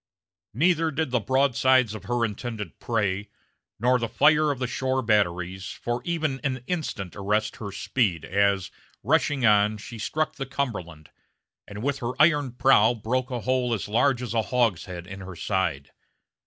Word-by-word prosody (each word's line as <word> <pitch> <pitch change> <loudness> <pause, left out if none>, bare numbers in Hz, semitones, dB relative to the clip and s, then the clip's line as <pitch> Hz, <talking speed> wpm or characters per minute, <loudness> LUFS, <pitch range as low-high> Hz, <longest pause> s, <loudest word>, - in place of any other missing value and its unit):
Neither 165 +3 +3
did 155 -2 -2
the 125 - +2
broadsides 130 0 +3
of 110 - -8
her 120 -1 +1
intended 105 -3 -6
prey, 105 -3 -1 0.5
nor 125 +3 +3
the 115 -1 -2
fire 150 +5 +4
of 140 - -1
the 130 - -2
shore 130 +1 -1
batteries, 95 -3 0
for 120 0 -4
even 155 -6 -1
an 130 -3 -2
instant 130 - -4
arrest 105 +2 -1
her 100 -2 -6
speed 95 - -1
as, 100 0 +1 0.3
rushing 145 0 +2
on, 105 0 +4
she 110 +2 -9
struck 155 +6 -2
the 135 -2 -4
Cumberland, 95 - -4 0.6
and 105 +2 -8
with 140 0 -1
her 125 +1 -4
iron 145 -5 +4
prow 120 -3 +4
broke 125 +4 -2
a 125 -2 -3
hole 125 -1 +1
as 105 - -5
large 125 +4 +2
as 120 -3 -4
a 115 - +2
hogshead 95 -7 -1
in 95 +2 -9
her 95 -1 -8
side. 85 -8 -2
120 Hz, 165 wpm, -25 LUFS, 100-135 Hz, 0.6 s, fire